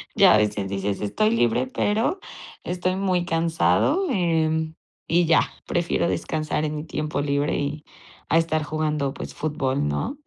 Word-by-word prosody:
ya - - +7
a - - +6
veces 105 -2 0
dices: 100 +1 -2
“Estoy 215 - +1
libre, 125 - +2
pero 220 - 0 0.4
estoy 180 +1 -1
muy 185 -2 0
cansado”, 170 - +2
em, 160 -5 +1 0.3
y 170 +1 +3
ya, 160 - +5 0.3
"prefiero 175 -1 0
descansar 155 -2 -2
en 150 0 -3
mi 150 - -4
tiempo 155 -2 -2
libre 145 0 0
y 145 +1 -3 0.5
a 165 - +4
estar 155 -2 +1
jugando, 150 -2 -1
pues, - - -7
fútbol", 135 - -1
¿no? 75 - -2
155 Hz, 150 wpm, -24 LUFS, 140-175 Hz, 0.5 s, ya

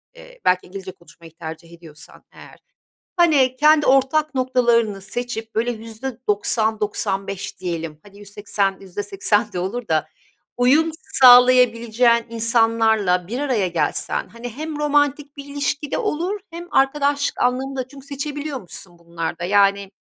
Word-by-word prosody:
eee, - - -15
belki 180 0 +2
İngilizce 190 0 -8
konuşmayı 170 -2 -17
tercih 165 0 -9
ediyorsan 165 -2 -15
eğer. - - -15 0.6
Hani, 285 -7 +3
kendi 300 +1 +4
ortak 275 +3 +2
noktalarını 235 -5 +1
seçip, 225 +2 -6
böyle 230 +2 0
%90-%95 215 -4 -3
diyelim, 165 -4 -5
hani, 200 0 -16
%80-%80 205 +1 -2
de 180 - -4
olur 220 +6 -4
da 155 -1 0 0.5
uyum 285 +7 +4 0.2
sağlayabileceğin 245 -2 +5
insanlarla 225 -5 +2
bir 245 +5 -3
araya 240 -10 0
gelsen, 175 +1 -2
hani, 235 +4 -8
hem 300 +5 -6
romantik 290 0 0
bir 280 - -8
ilişki 285 +1 -3
de - - -1
olur 400 -1 -2
hem 345 +1 -9
arkadaşlık 285 +1 +1
anlamında 260 +1 -1
çünkü 275 0 -14
seçebiliyormuşsun 280 - -6
bunlarda, 170 0 -5
yani, 200 +1 +2
230 Hz, 120 wpm, -21 LUFS, 195-275 Hz, 0.6 s, sağlayabileceğin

